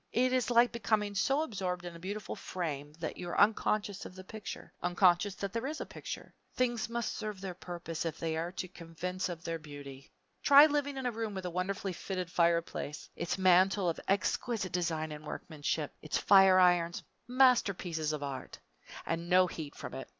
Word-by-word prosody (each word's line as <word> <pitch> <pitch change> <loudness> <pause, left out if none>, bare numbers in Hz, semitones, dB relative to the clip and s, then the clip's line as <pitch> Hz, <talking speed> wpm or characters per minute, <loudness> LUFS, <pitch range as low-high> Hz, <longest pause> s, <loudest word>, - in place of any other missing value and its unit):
It 255 +2 +3
is 255 -3 +1
like 240 0 +5
becoming 210 -2 0
so 270 +9 +2
absorbed 185 - -3
in 175 -1 -7
a - - -10
beautiful 205 +4 -5
frame 150 -5 -4
that 160 - -3
you 175 - -5
are - - -1
unconscious 205 -1 +2
of 180 - -10
the 185 - -9
picture 215 +2 -8
unconscious 180 +2 +3
that 200 0 -4
there 230 +3 -2
is 310 +2 -4
a - - -4
picture. - - -8 0.2
Things 240 -3 0
must 235 0 -2
serve 215 -3 -5
their 190 -1 -5
purpose 175 -2 -5
if 165 -1 -3
they 160 -1 -2
are 165 +2 -2
to 185 - -4
convince 180 +1 -5
of 170 -1 -6
their 165 0 -3
beauty. 145 -3 -10 0.3
Try 285 +1 +9
living 290 -2 0
in 265 - -4
a 245 - +1
room 220 -2 -4
with 190 -1 -5
a 180 - -3
wonderfully 190 +2 -2
fitted 180 -1 -4
fireplace; 170 -3 0
its 175 - -2
mantel 185 0 +4
of 165 - -3
exquisite 195 0 0
design 160 -3 -1
and 150 0 -8
workmanship, 155 -1 -3
its 155 - -1
fire 195 -2 +7
irons 175 -2 +3 0.2
masterpieces 200 - +3
of 150 -1 -3
art 135 -2 -6 0.5
and 170 +1 -3
no 185 0 +6
heat 160 -4 -6
from - - -7
it! - - -7
185 Hz, 190 wpm, -32 LUFS, 165-210 Hz, 0.5 s, Try